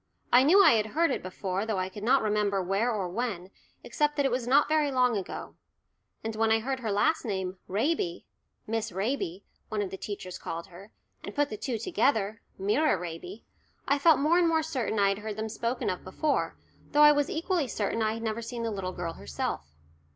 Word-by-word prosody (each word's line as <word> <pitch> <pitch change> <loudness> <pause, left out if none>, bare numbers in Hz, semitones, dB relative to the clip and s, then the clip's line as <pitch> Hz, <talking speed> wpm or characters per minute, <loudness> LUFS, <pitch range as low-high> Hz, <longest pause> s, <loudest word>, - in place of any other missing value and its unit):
I 245 - +8
knew 360 +9 +6
I - - +8
had 220 -2 +2
heard 335 -2 +4
it - - -1
before, 185 +1 -3
though 220 -2 -2
I 185 0 -1
could 195 +2 -9
not 255 +4 +3
remember 210 -2 +1
where 195 +6 +1
or 200 -5 -1
when, 190 -2 -3 0.3
except 295 -1 0
that 285 -1 +1
it 270 - +2
was 245 -1 -1
not 275 +3 +5
very 305 -1 +2
long 250 -3 +2
ago. 195 -3 -5 0.7
And 220 0 -3
when 225 0 +2
I 220 - +5
heard 260 +4 -2
her 225 -4 -2
last 205 +10 +2
name, 190 -4 -3
"Raby" 205 - -1 0.4
"Miss 225 -1 -2
Raby" 195 -2 -2 0.3
one 215 - -2
of 200 -2 -2
the 190 - -5
other - - -34
teachers 185 -3 -6
called 165 +1 -5
her 190 +4 -13 0.3
and - - -7
put 290 0 +1
the - - -3
two 235 +2 -2
together 220 - 0 0.2
"Myra 210 +7 +2
Raby" 175 +4 -7 0.4
I 280 +1 +2
felt 320 +1 +6
more 315 +5 +3
and 345 - +4
more 320 -1 +2
certain 260 -8 -2
I 200 -1 +4
had 195 +1 -1
heard 215 0 -5
them 220 0 -3
spoken 235 +3 -2
of 180 - -2
before, 285 +11 -1 0.4
though 295 +1 +6
I 295 - +9
was 290 -1 +1
equally 330 -2 0
certain 225 0 -2
I 215 0 +1
had 225 0 -6
never 220 0 -2
seen 235 0 -5
the 230 - -1
little 190 -3 -4
girl 175 -2 -4
herself. 70 +1 -5
220 Hz, 215 wpm, -28 LUFS, 195-275 Hz, 0.7 s, I